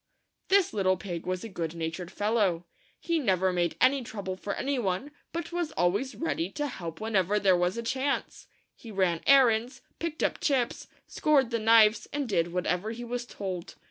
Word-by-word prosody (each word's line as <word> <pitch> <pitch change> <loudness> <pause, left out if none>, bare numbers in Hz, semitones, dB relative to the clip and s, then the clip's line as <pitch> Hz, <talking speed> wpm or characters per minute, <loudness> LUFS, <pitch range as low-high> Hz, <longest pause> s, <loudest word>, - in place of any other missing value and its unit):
This 390 -2 +3
little 185 -2 +2
pig 175 -4 -6
was 185 0 -2
a - - -5
good 170 -5 -4
natured 165 +2 -4
fellow. 205 -5 +1 0.3
He 335 -1 0
never 190 - +2
made 175 -2 0
any 270 +1 +4
trouble 200 -5 -5
for 200 +1 -4
any 275 -1 -1
one, 200 +6 -2 0.2
but 335 0 -5
was 345 -2 -2
always 200 +10 0
ready 185 - -2
to 295 - -2
help 170 - -6
when 220 0 -3
ever 195 +2 +3
there 190 -3 +4
was 180 +3 0
a 235 - -3
chance. 265 +4 -2 0.3
He 230 - -12
ran 185 -5 0
errands, 250 -3 +4 0.2
picked 330 -1 -3
up - - 0
chips, 260 -5 0 0.2
scoured 275 -5 +2
the 230 - 0
knives, 220 0 +5
and 290 -2 -2
did 170 -5 0
whatever 180 +3 -1
he 230 +2 -6
was 240 0 -4
told. 185 -6 -6
215 Hz, 185 wpm, -28 LUFS, 180-260 Hz, 0.3 s, knives